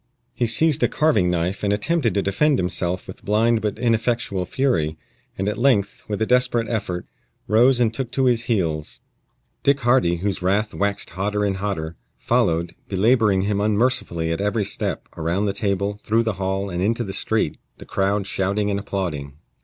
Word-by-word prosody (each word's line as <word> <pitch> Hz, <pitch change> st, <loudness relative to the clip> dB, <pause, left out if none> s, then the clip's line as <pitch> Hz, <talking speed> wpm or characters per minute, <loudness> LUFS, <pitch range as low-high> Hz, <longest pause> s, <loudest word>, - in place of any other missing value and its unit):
He 120 Hz, -, 0 dB
seized 155 Hz, +6 st, +2 dB
a -, -, +4 dB
carving 145 Hz, -, +2 dB
knife 90 Hz, +3 st, -1 dB
and 100 Hz, -, +1 dB
attempted 115 Hz, +4 st, 0 dB
to 100 Hz, -, +1 dB
defend 140 Hz, +9 st, +2 dB
himself 90 Hz, -1 st, -2 dB
with -, -, -11 dB
blind 110 Hz, +2 st, +2 dB
but 105 Hz, 0 st, -2 dB
ineffectual 115 Hz, -5 st, 0 dB
fury, 85 Hz, -, 0 dB, 0.4 s
and 95 Hz, -, -2 dB
at 105 Hz, -, -2 dB
length, 115 Hz, -6 st, +1 dB
with 105 Hz, -2 st, -3 dB
a -, -, +1 dB
desperate 125 Hz, -1 st, +2 dB
effort, 90 Hz, -6 st, -3 dB, 0.4 s
rose 120 Hz, +4 st, +4 dB
and 115 Hz, -2 st, +2 dB
took 125 Hz, 0 st, -3 dB
to 135 Hz, -, +2 dB
his 120 Hz, -2 st, +2 dB
heels. 85 Hz, -, -1 dB, 0.6 s
Dick 140 Hz, 0 st, +2 dB
Hardy, 120 Hz, -8 st, +3 dB
whose 95 Hz, +3 st, -2 dB
wrath 100 Hz, +4 st, +1 dB
waxed 100 Hz, 0 st, -1 dB
hotter 105 Hz, +2 st, -1 dB
and 95 Hz, -2 st, -1 dB
hotter, 85 Hz, -5 st, -3 dB, 0.2 s
followed, 85 Hz, -9 st, +1 dB, 0.2 s
belaboring 105 Hz, -1 st, +3 dB
him 100 Hz, 0 st, 0 dB
unmercifully 105 Hz, -6 st, +1 dB
at 85 Hz, -, -2 dB
every 105 Hz, +1 st, 0 dB
step, 100 Hz, -, -2 dB
around 85 Hz, +5 st, 0 dB
the 100 Hz, -, 0 dB
table, 100 Hz, 0 st, -1 dB
through 115 Hz, +2 st, +2 dB
the 110 Hz, -2 st, -1 dB
hall, 95 Hz, +1 st, -1 dB
and 90 Hz, 0 st, -2 dB
into 115 Hz, +5 st, +1 dB
the 95 Hz, -3 st, -5 dB
street, -, -, 0 dB, 0.2 s
the -, -, -11 dB
crowd 100 Hz, +1 st, 0 dB
shouting 100 Hz, +2 st, 0 dB
and 100 Hz, -, -1 dB
applauding. 85 Hz, -9 st, -4 dB
105 Hz, 175 wpm, -22 LUFS, 95-115 Hz, 0.6 s, a